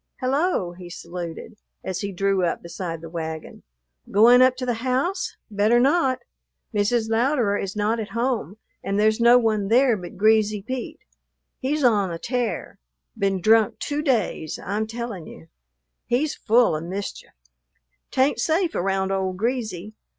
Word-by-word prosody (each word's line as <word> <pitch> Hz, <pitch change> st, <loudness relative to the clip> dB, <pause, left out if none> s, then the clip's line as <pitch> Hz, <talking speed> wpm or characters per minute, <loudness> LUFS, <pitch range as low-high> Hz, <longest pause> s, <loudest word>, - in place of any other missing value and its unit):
"Hello!" 270 Hz, -, 0 dB
he 175 Hz, 0 st, -11 dB
saluted, 170 Hz, +2 st, -7 dB, 0.3 s
as 190 Hz, -1 st, -3 dB
he 200 Hz, +1 st, -3 dB
drew 195 Hz, 0 st, +1 dB
up 170 Hz, -, -1 dB
beside 170 Hz, -1 st, -5 dB
the 165 Hz, -, -9 dB
wagon. 160 Hz, -2 st, -6 dB, 0.5 s
"Goin' 235 Hz, +5 st, +6 dB
up 255 Hz, 0 st, +5 dB
to 255 Hz, 0 st, -4 dB
the 235 Hz, -2 st, -2 dB
house? 260 Hz, +9 st, -1 dB
Better 210 Hz, +4 st, +3 dB
not. 270 Hz, 0 st, +2 dB, 0.5 s
Mrs. 220 Hz, +2 st, +1 dB
Louderer 230 Hz, -1 st, +1 dB
is 195 Hz, +1 st, -4 dB
not 215 Hz, +2 st, 0 dB
at 215 Hz, -, -4 dB
home, 230 Hz, -, -1 dB, 0.3 s
and 200 Hz, +1 st, -1 dB
there's 215 Hz, +1 st, +3 dB
no 235 Hz, +1 st, +7 dB
one 215 Hz, -4 st, +1 dB
there 245 Hz, +2 st, +4 dB
but 180 Hz, -4 st, -9 dB
Greasy 215 Hz, 0 st, +3 dB
Pete. 255 Hz, +3 st, -5 dB, 0.6 s
He's 290 Hz, +3 st, -1 dB
on 205 Hz, -7 st, +3 dB
a 165 Hz, -, -4 dB
tear; 240 Hz, -2 st, -3 dB, 0.4 s
been 195 Hz, -3 st, 0 dB
drunk 220 Hz, +1 st, +4 dB
two 290 Hz, +1 st, -2 dB
days, 225 Hz, -, -1 dB
I'm 210 Hz, +3 st, -1 dB
tellin' 225 Hz, -6 st, -6 dB
you. 165 Hz, -, -13 dB, 0.6 s
He's 265 Hz, +5 st, +1 dB
full 230 Hz, -5 st, +3 dB
of 155 Hz, -, -4 dB
mischief. 195 Hz, +3 st, -6 dB, 0.8 s
'T 260 Hz, -, 0 dB
ain't 265 Hz, -3 st, +2 dB
safe 330 Hz, +6 st, +1 dB
around 190 Hz, +1 st, 0 dB
old 190 Hz, -1 st, -1 dB
Greasy. 215 Hz, -4 st, -3 dB
215 Hz, 155 wpm, -23 LUFS, 190-245 Hz, 0.8 s, no